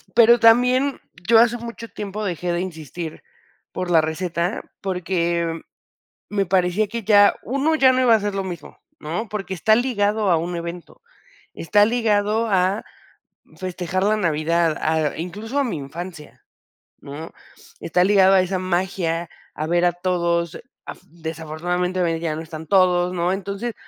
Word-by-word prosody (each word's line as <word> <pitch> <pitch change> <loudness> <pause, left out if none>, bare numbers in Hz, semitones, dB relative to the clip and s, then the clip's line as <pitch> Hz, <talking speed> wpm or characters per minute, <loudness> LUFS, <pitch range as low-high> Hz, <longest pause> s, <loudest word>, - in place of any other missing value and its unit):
pero 235 0 +6
también 250 +4 +4 0.3
yo 225 -1 +7
hace 235 +1 +4
mucho 230 0 -8
tiempo 210 +1 -6
dejé 175 -1 -2
de 175 +1 -1
insistir 160 -2 -7 0.5
por 180 -1 -4
la 165 -2 +6
receta, 170 +3 -2 0.2
porque 170 -3 -1 0.7
me 200 -2 -1
parecía 185 +3 +1
que 230 +1 -5
ya, 205 -1 +6
1 275 +6 0
ya 265 -4 +5
no 255 - +1
iba 235 -2 +5
a 220 - +3
ser 205 -1 -3
lo 195 - -2
mismo, 180 -2 -8 0.2
¿no?, 175 +9 -4
porque 195 -3 -4
está 215 +5 +3
ligado 215 -4 +1
a 170 - +4
un 175 +2 -3
evento, 170 - -8 0.5
está 205 +5 +3
ligado 220 -1 +1
a 190 +2 +1 0.7
festejar 185 0 -3
la 215 +1 +2
Navidad, 165 -1 +1
a 155 -2 0
incluso 210 - -4
a 280 - +2
mi 205 -10 -3
infancia, 155 +2 -9 0.6
¿no?, 150 +4 -9 0.5
está 180 +2 +1
ligado 195 -1 +5
a 190 - +6
esa 185 0 -1
magia, 175 -2 -1 0.3
a 155 - -3
ver 175 +2 +2
a 175 - +3
todos, 170 -2 -1 0.3
af - - -8
desafortunadamente 165 +3 -3
hoy 165 -2 0
ya 160 -2 -2
no 160 - -5
están 160 -1 -9
todos, 180 -1 +3
¿no?, 175 +1 0
entonces, 200 +4 -4
185 Hz, 155 wpm, -22 LUFS, 170-210 Hz, 0.7 s, yo